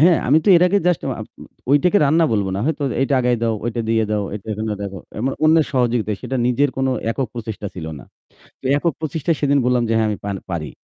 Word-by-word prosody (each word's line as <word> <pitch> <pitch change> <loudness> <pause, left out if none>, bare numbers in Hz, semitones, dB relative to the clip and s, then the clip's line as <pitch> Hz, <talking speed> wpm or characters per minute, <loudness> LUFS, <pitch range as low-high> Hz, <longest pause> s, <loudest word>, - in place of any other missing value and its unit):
হ্যাঁ, 170 +1 +6
আমি 150 - +6
তো - - +1
এর 170 - +4
আগে 200 +3 +3
just 175 -5 +2
উ - - -1
আ - - -3 0.5
ওইটাকে 180 +8 +4
রান্না 160 +4 +3
বলবো 100 -3 0
না। 95 - -2
হয়তো 155 -1 -1 0.2
এইটা 135 +1 +2
আগায় 125 -1 +2
দাও, 115 -1 +1
ওইটা 120 0 -2
দিয়ে 110 0 +2
দাও, 105 -1 0
এইটা 105 +1 -8
এখানে 110 +1 -3
রাখো। 100 -1 -5 0.2
এমন 130 +4 -1
অন্যের 160 0 +5
সহযোগিতা। 120 -4 +1
সেটা 130 - -3
নিজের 140 +4 +2
কোনো 130 0 +1 0.2
একক 130 +3 -1
প্রচেষ্টা 110 -3 -5
ছিল 80 -3 -6
না। - - -12 0.6
তো - - -22
একক 165 +2 0
প্রচেষ্টায় 155 0 -1
সেদিন 140 -1 +3
বললাম 125 -1 +2
যে 115 - 0
হ্যাঁ, 110 -1 +2
"আমি 105 - -1
পান 100 -1 -2
পারি।" 80 -4 -3
125 Hz, 235 wpm, -20 LUFS, 110-150 Hz, 0.6 s, হ্যাঁ